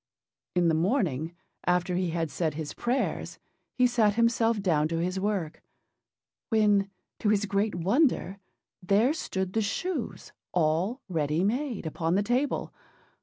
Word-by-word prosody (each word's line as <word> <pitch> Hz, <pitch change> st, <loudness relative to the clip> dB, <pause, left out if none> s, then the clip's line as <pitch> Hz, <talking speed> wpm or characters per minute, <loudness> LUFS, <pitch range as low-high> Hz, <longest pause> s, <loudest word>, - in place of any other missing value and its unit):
In 175 Hz, -1 st, +3 dB
the 165 Hz, -, +3 dB
morning 165 Hz, -, 0 dB, 0.3 s
after 180 Hz, 0 st, +2 dB
he 180 Hz, -1 st, 0 dB
had 165 Hz, -2 st, -2 dB
said 160 Hz, -4 st, -1 dB
his 155 Hz, -1 st, -5 dB
prayers, 245 Hz, +3 st, -2 dB, 0.4 s
he 250 Hz, -, +4 dB
sat 225 Hz, -4 st, +3 dB
himself 230 Hz, -1 st, +2 dB
down 160 Hz, -6 st, +2 dB
to 165 Hz, +1 st, -2 dB
his 180 Hz, +3 st, -1 dB
work; 190 Hz, -6 st, -2 dB, 0.9 s
when, 210 Hz, -3 st, +3 dB, 0.3 s
to 210 Hz, -, +1 dB
his 210 Hz, -1 st, +2 dB
great 205 Hz, +1 st, 0 dB
wonder, 200 Hz, -, +1 dB, 0.4 s
there 205 Hz, +9 st, +3 dB
stood 190 Hz, -, -3 dB
the 225 Hz, -, +2 dB
shoes 255 Hz, -, -3 dB, 0.2 s
all 175 Hz, -, +1 dB
ready 160 Hz, -2 st, 0 dB
made, 240 Hz, -, -1 dB
upon 165 Hz, +2 st, -1 dB
the 200 Hz, -, +2 dB
table. 250 Hz, +6 st, 0 dB
195 Hz, 140 wpm, -28 LUFS, 170-225 Hz, 0.9 s, he